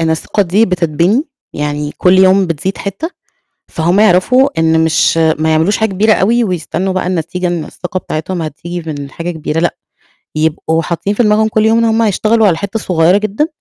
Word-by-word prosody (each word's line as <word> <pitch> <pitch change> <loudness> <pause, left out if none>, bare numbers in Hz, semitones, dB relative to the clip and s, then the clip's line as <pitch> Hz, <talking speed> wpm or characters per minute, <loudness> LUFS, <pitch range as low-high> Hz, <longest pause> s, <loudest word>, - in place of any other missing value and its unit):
إن 160 0 0
الثقة 160 +5 0
دي 195 +5 +2
بتتبني، 180 - 0 0.3
يعني 150 0 -3
كُلّ 185 +1 +4
يوم 190 0 +4
بتزيد 170 +4 -3
حتّة، 200 - -5 0.6
فهم 175 +5 0
يعرفوا 220 +7 +4
إن 160 0 +2
مش 160 0 +2 0.2
ما 160 0 0
يعملوش 160 +6 +2
حاجة 220 -1 0
كبيرة 210 +3 +2
أوي، 230 +5 +2
ويستنّوا 185 0 -2
بقى 185 -1 -2
النتيجة 180 +1 -2
إن 175 -3 -2
الثقة 185 +1 -5
بتاعتهم 170 +1 -4
هتيجي 170 +3 -6
من 140 -1 -7
حاجة 170 +4 -5
كبيرة 160 -1 -3
لأ، 175 - -1 0.6
يبقوا 160 +1 0
حاطّين 175 +5 -2
في 240 - +1
دماغهم 215 +1 +3
كُلّ 215 0 +1
يوم 225 +1 +3
إن 230 - +2
هم 225 0 +1
هيشتغلوا 220 +1 +2
على 170 -4 +2
حتّة 200 +4 -4
صغيّرة 180 -1 +2
جدًا 215 +8 -1
180 Hz, 185 wpm, -13 LUFS, 160-210 Hz, 0.6 s, كُلّ